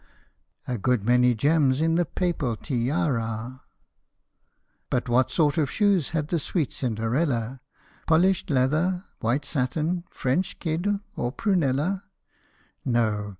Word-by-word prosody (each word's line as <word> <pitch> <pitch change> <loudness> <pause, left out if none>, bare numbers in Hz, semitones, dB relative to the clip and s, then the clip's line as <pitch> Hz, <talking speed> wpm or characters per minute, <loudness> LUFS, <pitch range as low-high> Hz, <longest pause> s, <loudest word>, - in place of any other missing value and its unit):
a 125 -3 -2
Good 115 0 +1
many 125 0 +4
gems 140 +1 +3
in 165 +1 +2
the 175 +1 +2
papal 165 -10 -1
tiara! 125 -2 -2 1.3
But 125 - -1
what 125 +1 +3
sort 150 +3 +2
of 150 - +1
shoes 200 -8 +2
had 155 -2 -2
the 170 - +1
sweet 155 0 -1
Cinderella 120 +1 -1 0.5
Polished 180 +4 +3
leather, 155 +8 +1
white 130 +6 0
satin, 155 +6 -1
French 135 +9 -1
kid, 165 +3 -2 0.3
or 120 - -2
prunella? 180 - 0 0.8
No 110 -4 0
140 Hz, 115 wpm, -25 LUFS, 125-165 Hz, 1.3 s, many